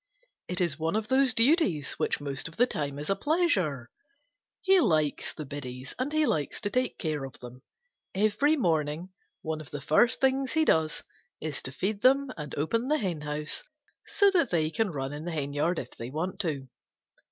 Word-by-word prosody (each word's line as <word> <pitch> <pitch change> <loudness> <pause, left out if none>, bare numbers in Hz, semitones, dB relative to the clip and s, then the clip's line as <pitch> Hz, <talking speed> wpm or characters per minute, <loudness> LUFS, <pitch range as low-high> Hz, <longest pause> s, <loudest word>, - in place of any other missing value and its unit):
It 180 +1 -2
is 170 -5 0
one 160 +5 0
of 220 +1 -1
those 260 -2 +4
duties 230 - +3
which - - +1
most 140 -1 -3
of 165 - -12
the 245 - +6
time 145 - -3
is 145 +1 -5
a - - +3
pleasure. 195 - +1 0.7
He 385 -1 +5
likes 155 - +1
the 155 - -7
biddies, 130 -2 -7
and 260 +3 -1
he 310 0 +3
likes 150 - -1
to 205 - -2
take 255 +2 0
care 155 -4 -2
of 135 +1 -8
them. 125 +1 -10 0.5
Every 215 +10 +3
morning 160 - 0 0.3
one 155 -1 -3
of 150 - -12
the 145 - -5
first 155 - +3
things 265 0 +2
he 315 0 +3
does 160 - +2 0.4
is 155 -3 -3
to 130 - -7
feed 200 +8 -2
them 270 +1 +4
and 150 -2 -6
open 230 - 0
the 305 +2 +3
henhouse 150 - -3 0.5
so 405 -1 +4
that 340 - +3
they 160 -2 +1
can 225 +2 0
run 135 -3 -4
in 150 +1 -6
the 175 - -3
henyard 150 +3 -1
if - - -5
they 115 - -7
want 180 +7 -3
to. 150 -8 -2
165 Hz, 190 wpm, -28 LUFS, 145-245 Hz, 0.7 s, the